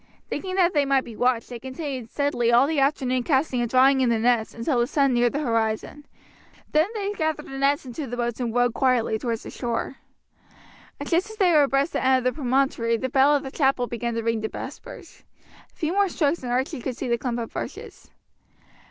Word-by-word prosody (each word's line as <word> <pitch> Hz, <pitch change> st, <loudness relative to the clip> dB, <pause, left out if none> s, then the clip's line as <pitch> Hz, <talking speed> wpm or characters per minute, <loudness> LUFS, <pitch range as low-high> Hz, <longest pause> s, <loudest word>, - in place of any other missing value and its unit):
Thinking 370 Hz, -1 st, -4 dB
that 360 Hz, -2 st, +3 dB
they 290 Hz, -2 st, +3 dB
might 275 Hz, -1 st, +2 dB
be 230 Hz, -, -10 dB
watched, 245 Hz, 0 st, +1 dB
they 240 Hz, -1 st, -7 dB
continued 260 Hz, -1 st, -6 dB
steadily 280 Hz, -5 st, 0 dB
all 240 Hz, +3 st, +6 dB
the 305 Hz, 0 st, 0 dB
afternoon 265 Hz, -2 st, +1 dB
casting 265 Hz, -1 st, +1 dB
and 240 Hz, -, -1 dB
drawing 265 Hz, +2 st, +4 dB
in 250 Hz, -, +3 dB
the 230 Hz, -, +2 dB
nets, 230 Hz, -1 st, +1 dB
until 240 Hz, +3 st, 0 dB
the 240 Hz, -, +2 dB
sun 275 Hz, -2 st, +2 dB
neared 240 Hz, 0 st, +3 dB
the 290 Hz, -, -2 dB
horizon. 230 Hz, +3 st, -2 dB, 0.6 s
Then 310 Hz, +3 st, +3 dB
they 410 Hz, -1 st, -2 dB
gathered 315 Hz, -5 st, -2 dB
the 270 Hz, 0 st, -7 dB
nets 280 Hz, +2 st, +1 dB
into 260 Hz, +3 st, -6 dB
the 245 Hz, +1 st, -5 dB
boat 240 Hz, -1 st, -2 dB
and 240 Hz, -2 st, -2 dB
rowed 245 Hz, 0 st, +2 dB
quietly 245 Hz, -4 st, +1 dB
towards 230 Hz, -1 st, -3 dB
the -, -, -8 dB
shore. 240 Hz, +2 st, -3 dB, 1.1 s
Just 365 Hz, +5 st, 0 dB
as 440 Hz, -, -9 dB
they 375 Hz, -4 st, +4 dB
were 305 Hz, -3 st, +6 dB
abreast 275 Hz, +2 st, +1 dB
the -, -, -1 dB
end 260 Hz, 0 st, +4 dB
of 255 Hz, -, -3 dB
the 255 Hz, 0 st, +1 dB
promontory 255 Hz, -4 st, +1 dB
the 260 Hz, +3 st, -3 dB
bell 275 Hz, +3 st, +4 dB
of 285 Hz, -, -1 dB
the 270 Hz, -, -6 dB
chapel 270 Hz, -4 st, +1 dB
began 235 Hz, -1 st, -4 dB
to 230 Hz, -, -2 dB
ring 230 Hz, -1 st, 0 dB
the 220 Hz, -, -1 dB
vespers. -, -, -10 dB, 0.5 s
A -, -, -35 dB
few 320 Hz, +2 st, -2 dB
more 400 Hz, 0 st, +2 dB
strokes 315 Hz, -1 st, 0 dB
and 245 Hz, -2 st, -4 dB
Archie 255 Hz, 0 st, -1 dB
could 250 Hz, 0 st, -4 dB
see 265 Hz, -, -4 dB
the 235 Hz, -1 st, 0 dB
clump 245 Hz, -1 st, -2 dB
of 230 Hz, -2 st, -5 dB
bushes. -, -, -7 dB
260 Hz, 220 wpm, -24 LUFS, 240-285 Hz, 1.1 s, all